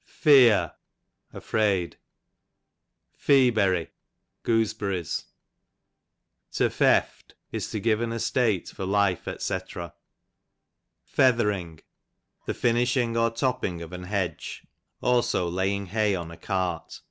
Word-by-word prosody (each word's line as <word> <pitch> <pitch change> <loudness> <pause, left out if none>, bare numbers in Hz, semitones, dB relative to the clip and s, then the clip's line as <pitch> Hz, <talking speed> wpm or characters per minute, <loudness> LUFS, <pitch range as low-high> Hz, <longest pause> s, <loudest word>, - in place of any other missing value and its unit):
Feear, 120 - +5 0.6
afraid. 100 -6 -1 1.2
Feaberry, 110 - +3 0.5
gooseberries. 105 -7 -1 1.3
To - - +2
Feft, - - +1 0.2
is - - -4
to 110 - -3
give 110 +1 +1
an 120 -1 -2
estate 115 -4 0
for - - -7
life, 100 -1 +1
dr. - - -5
(the 90 -3 -5 2.5
Jiiiishi)ig 120 0 +1
or 115 - +3
top 125 +2 -1
ping 85 -3 -3
of 85 +2 -10
an 90 0 -7
hedge, 95 -2 -4 0.4
also 120 -7 +2
laying 95 +3 -1
hay 105 +1 +1
on 85 -2 -6
a 85 - -11
^cart. 90 -2 -3
100 Hz, 100 wpm, -26 LUFS, 90-115 Hz, 2.5 s, Feear